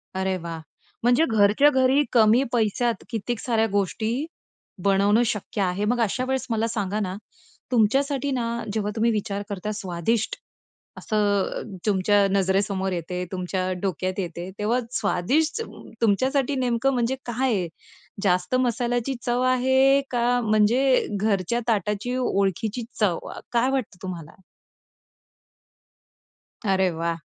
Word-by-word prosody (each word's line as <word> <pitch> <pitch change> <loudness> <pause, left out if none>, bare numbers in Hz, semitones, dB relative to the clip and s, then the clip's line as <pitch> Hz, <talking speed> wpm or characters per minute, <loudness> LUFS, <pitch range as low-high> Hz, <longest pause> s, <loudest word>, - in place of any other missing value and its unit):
अरे 190 0 0
वाह! 165 -1 -6 0.4
म्हणजे 245 +6 +4
घरच्या 215 +6 +5
घरी 265 +1 +3
कमी 230 +2 +5
पैशात 230 0 0
कितीक 230 0 -3
साऱ्या 225 -3 +1
गोष्टी 220 - -1 0.6
बनवणं 200 +4 +4
शक्य 210 -2 -3
आहे. 190 +2 0
मग 240 +2 +1
अशा 230 +4 0
वेळेस 265 -1 -1
मला 225 0 0
सांगा 210 -2 -2
ना, 190 -2 -2 0.6
तुमच्यासाठी 275 +5 +2
ना 245 -3 -1 0.3
जेव्हा 210 -1 -1
तुम्ही 230 +1 +2
विचार 205 -2 -2
करता 200 +1 -4
स्वादिष्ट 205 - -1 0.6
असं 215 - -2 0.4
अ, - - -6 0.2
तुमच्या 205 0 +3
नजरेसमोर 195 0 +1
येते, 180 +1 -3
तुमच्या 185 0 -2
डोक्यात 185 0 -2
येते, 175 0 -4
तेव्हा 225 +4 +1
स्वादिष्ट 290 - 0 0.4
तुमच्यासाठी 260 +6 +2
नेमकं 255 +1 +1
म्हणजे 245 +1 0
काय 245 +1 0
आहे? 185 -4 0 0.6
जास्त 180 +4 +1
मसाल्याची 245 +1 0
चव 245 +1 +1
आहे 265 +2 +4
का 245 0 +2
म्हणजे 230 +5 +3
घरच्या 210 +2 0
ताटाची 215 +2 0
ओळखीची 215 0 0 0.2
चव. 190 -6 +2 0.2
अ, - - -7
काय 240 +2 +2
वाटतं 260 -8 -2
तुम्हाला? 170 -3 -7 2.3
अरे 190 -1 +2
वाह! 165 0 -2
220 Hz, 125 wpm, -24 LUFS, 195-245 Hz, 2.3 s, घरच्या